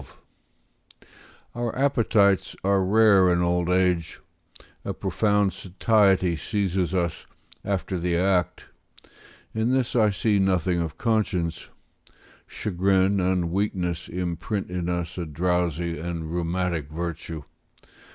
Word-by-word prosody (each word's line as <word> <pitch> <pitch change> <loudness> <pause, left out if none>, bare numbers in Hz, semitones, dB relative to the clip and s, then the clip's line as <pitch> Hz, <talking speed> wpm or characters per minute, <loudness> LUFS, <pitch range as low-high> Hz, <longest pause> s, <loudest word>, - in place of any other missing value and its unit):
] - - -26
Our 120 -1 -3
appetites 110 - +2
are 100 0 +2
rare 100 -2 +5
in 90 0 +2
old 90 0 0
age; 90 -2 +1 0.6
a - - -4
profound 105 -2 +1
satiety 95 -2 +2
seizes 95 0 -1
us 85 -3 -2 0.4
after 95 -2 -2
the 85 0 0
act; 90 -2 0 0.9
in 110 +2 0
this 130 -2 0
I 110 -3 +4
see 100 +1 +1
nothing 90 -2 +1
of 80 -2 -5
conscience; 95 -8 -1 0.8
chagrin 95 0 +1
and 90 -2 0
weakness 90 -3 -2
imprint 90 +3 -3
in 90 -1 -2
us 85 0 -3
a 85 - -3
drowsy 85 0 -1
and 80 -1 -5
rheumatic 85 -3 -2
virtue. 85 -1 -5
90 Hz, 110 wpm, -25 LUFS, 85-100 Hz, 0.9 s, rare